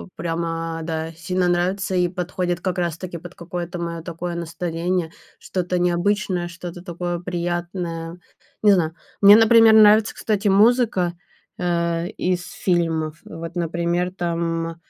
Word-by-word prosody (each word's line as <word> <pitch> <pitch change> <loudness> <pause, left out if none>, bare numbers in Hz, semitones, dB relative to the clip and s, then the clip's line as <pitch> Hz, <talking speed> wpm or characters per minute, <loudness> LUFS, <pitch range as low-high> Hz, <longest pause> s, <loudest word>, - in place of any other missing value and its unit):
прямо, 165 -1 -3
да, 160 0 -3
сильно 180 +2 -1
нравится 185 +2 0
и 180 -1 +3
подходит 180 -1 -3
как 185 0 -2
раз 170 -3 -1
таки 175 -1 -6
под 175 +2 -11
какое-то 175 0 -5
мое 170 -1 -4
такое 170 0 -5
настроение, 170 0 -2 0.3
что-то 180 -1 -2
необычное, 180 +1 0
что-то 175 0 -8
такое 175 -1 -4
приятное. 175 -1 -4 0.4
Не 210 -1 +6
знаю. 165 -3 +1 0.3
Мне, 200 +1 +10
например, 225 0 +7
нравится, 215 0 +6
кстати, 210 -1 -1
музыка, 205 -3 +3 0.4
э, 170 -1 0
из 180 -1 0
фильмов. 165 -3 -1
Вот, 165 +1 -8
например, 170 +1 -1
там 165 -2 -2
175 Hz, 130 wpm, -22 LUFS, 170-185 Hz, 0.4 s, Мне